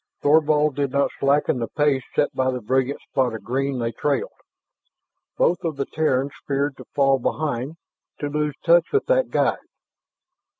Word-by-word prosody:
Thorvald 150 Hz, -1 st, +3 dB
did 140 Hz, -1 st, 0 dB
not 140 Hz, +2 st, +1 dB
slacken 140 Hz, -1 st, +2 dB
the 115 Hz, -, -2 dB
pace 145 Hz, -3 st, +1 dB
set 145 Hz, -, +1 dB
by 130 Hz, 0 st, +1 dB
the 130 Hz, -1 st, -2 dB
brilliant 130 Hz, +4 st, 0 dB
spot 125 Hz, -4 st, -1 dB
of 110 Hz, -, -8 dB
green 135 Hz, +2 st, -1 dB
they 115 Hz, -1 st, -2 dB
trailed. 140 Hz, +2 st, -1 dB, 1.1 s
Both 175 Hz, -, +2 dB
of 165 Hz, -3 st, -2 dB
the 140 Hz, -, -1 dB
Terrans 140 Hz, -3 st, 0 dB, 0.2 s
feared 140 Hz, 0 st, 0 dB
to -, -, -11 dB
fall 135 Hz, -1 st, +3 dB
behind, 145 Hz, +1 st, -2 dB, 0.4 s
to 145 Hz, -, -2 dB
lose 150 Hz, 0 st, -2 dB
touch 170 Hz, 0 st, +5 dB
with 420 Hz, -, +1 dB
that -, -, +2 dB
guide. -, -, +1 dB
140 Hz, 165 wpm, -23 LUFS, 130-150 Hz, 1.1 s, touch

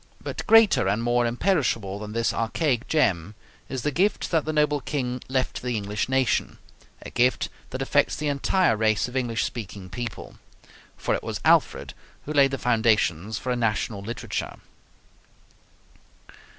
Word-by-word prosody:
But -, -, -6 dB
greater 225 Hz, -, +6 dB
and 105 Hz, +4 st, 0 dB
more 120 Hz, 0 st, +2 dB
imperishable 120 Hz, -, 0 dB
than 105 Hz, 0 st, -7 dB
this 115 Hz, 0 st, 0 dB
archaic 120 Hz, +2 st, 0 dB
gem 105 Hz, -, +1 dB, 0.3 s
is 130 Hz, -3 st, -4 dB
the 150 Hz, -, 0 dB
gift 190 Hz, +8 st, 0 dB
that 160 Hz, -3 st, +2 dB
the 155 Hz, -, -1 dB
noble 150 Hz, -1 st, +1 dB
King 125 Hz, -3 st, -3 dB
left 130 Hz, 0 st, -1 dB
to -, -, -7 dB
the 125 Hz, -2 st, -2 dB
English 105 Hz, +3 st, -3 dB
nation 130 Hz, -1 st, +1 dB, 0.5 s
a -, -, -9 dB
gift 125 Hz, +1 st, +2 dB, 0.2 s
that 130 Hz, +1 st, -3 dB
affects 145 Hz, +1 st, +2 dB
the 150 Hz, -, -3 dB
entire 145 Hz, +1 st, +2 dB
race 110 Hz, 0 st, +1 dB
of 125 Hz, -, -10 dB
English 120 Hz, -3 st, 0 dB
speaking 100 Hz, -5 st, -6 dB
people. 120 Hz, -2 st, -6 dB, 0.6 s
For -, -, -1 dB
it -, -, -1 dB
was -, -, -4 dB
Alfred -, -, +3 dB, 0.3 s
who 150 Hz, -, -4 dB
laid 140 Hz, -2 st, +5 dB
the 135 Hz, -, -3 dB
foundations 110 Hz, -5 st, +1 dB
for 130 Hz, -, -3 dB
a -, -, +1 dB
national 110 Hz, -3 st, -1 dB
literature. 115 Hz, +4 st, -4 dB
120 Hz, 160 wpm, -25 LUFS, 110-140 Hz, 0.6 s, greater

